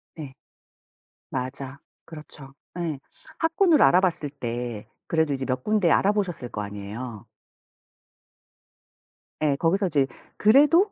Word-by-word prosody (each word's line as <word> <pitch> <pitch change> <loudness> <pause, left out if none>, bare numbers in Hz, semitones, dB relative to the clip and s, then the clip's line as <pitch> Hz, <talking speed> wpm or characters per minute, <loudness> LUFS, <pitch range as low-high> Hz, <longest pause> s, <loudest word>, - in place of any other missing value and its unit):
네. 145 -5 -8 1.0
맞아, 135 +1 -5 0.3
그렇죠. 150 -3 -10 0.3
예. 165 -4 -2 0.4
학군을 325 -1 +3
알아봤을 175 -5 +3
때 120 -5 -5 0.2
그래도 160 -3 +1
이제 135 -1 -2
몇 130 -1 -2
군데 210 -6 +2
알아보셨을 195 -10 +1
거 105 - -4
아니에요. 105 +2 -7 2.2
예. 145 -2 +3
거기서 185 +6 +1
이제 145 -5 +2 0.3
그래도 295 - +5
150 Hz, 230 characters per minute, -25 LUFS, 130-195 Hz, 2.2 s, 그래도